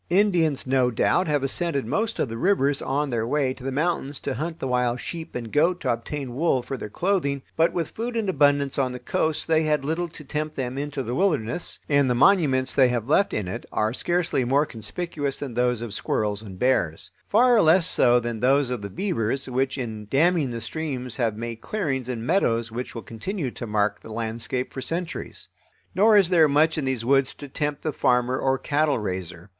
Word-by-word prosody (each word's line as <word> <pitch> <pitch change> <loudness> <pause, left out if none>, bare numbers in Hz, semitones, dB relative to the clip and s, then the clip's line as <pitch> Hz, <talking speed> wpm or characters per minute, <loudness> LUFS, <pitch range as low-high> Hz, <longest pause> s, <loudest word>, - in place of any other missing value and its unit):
Indians, 175 -6 +2
no 130 -1 +2
doubt, 145 +9 +1
have 145 -3 +1
ascended 140 -1 0
most 220 - -1
of - - 0
the 115 - -6
rivers 145 -2 +1
on 145 +2 -1
their 115 -2 -1
way 135 -1 +1
to 130 - -14
the 135 - -2
mountains 145 -1 -1
to 140 - -2
hunt 160 +4 -4
the 135 - -4
wild 125 -1 +1
sheep 165 +5 -7
and 115 -3 -5
goat 170 +4 +3
to - - +1
obtain 130 +2 -5
wool 135 -2 +1
for 135 - -4
their 105 - -6
clothing, 140 - 0
but 165 +1 +3
with 170 -3 -2
food 235 +1 -4
in 220 -3 -1
abundance 145 -4 +2
on 130 -2 0
the 125 - -6
coast 155 +5 -1
they 160 -1 +3
had 150 -3 0
little 165 +4 -1
to 160 -2 -12
tempt 150 +2 -4
them 130 -1 -3
into 145 -1 -3
the 120 - -4
wilderness, 150 - -1
and 140 -2 +3
the 125 - +2
monuments 135 -5 +3
they 130 -2 +5
have 120 -2 -2
left 180 +7 +3
in 105 -4 -2
it 90 - -5
are 110 +1 0
scarcely 175 -2 0
more 135 +5 +2
conspicuous 140 +5 -4
than 135 -4 -6
those 125 -1 +1
of 115 -4 -5
squirrels 105 0 -1
and 100 -4 -10
bears; 100 -6 0 0.2
far 240 +1 +5
less 165 +2 +5
so 125 -8 +4
than 120 -1 -4
those 135 +1 +3
of 125 -4 -3
the 100 - -5
beavers, 135 - -1
which 130 +2 -1
in 110 -5 -5
damming 155 +1 +3
the 115 -1 -4
streams 130 -2 -4
have 115 -4 0
made 115 0 -5
clearings 135 - -2
and 115 -2 -4
meadows 120 - +1
which 125 +3 -5
will 115 - -6
continue 130 - -4
to 120 - -7
mark 105 -1 0
the 110 - -12
landscape 115 +3 -3
for 130 - -5
centuries. 165 +6 -4 0.5
Nor 210 +3 +5
is 195 -4 +5
there 165 -4 +5
much 155 +3 +3
in 155 - -2
these 130 -3 -2
woods 135 0 +2
to 145 - -9
tempt 145 +1 -3
the 155 - -1
farmer 125 +1 +1
or 135 0 +1
cattle 150 +2 +1
raiser. 90 -3 -5
135 Hz, 210 wpm, -24 LUFS, 120-160 Hz, 0.5 s, they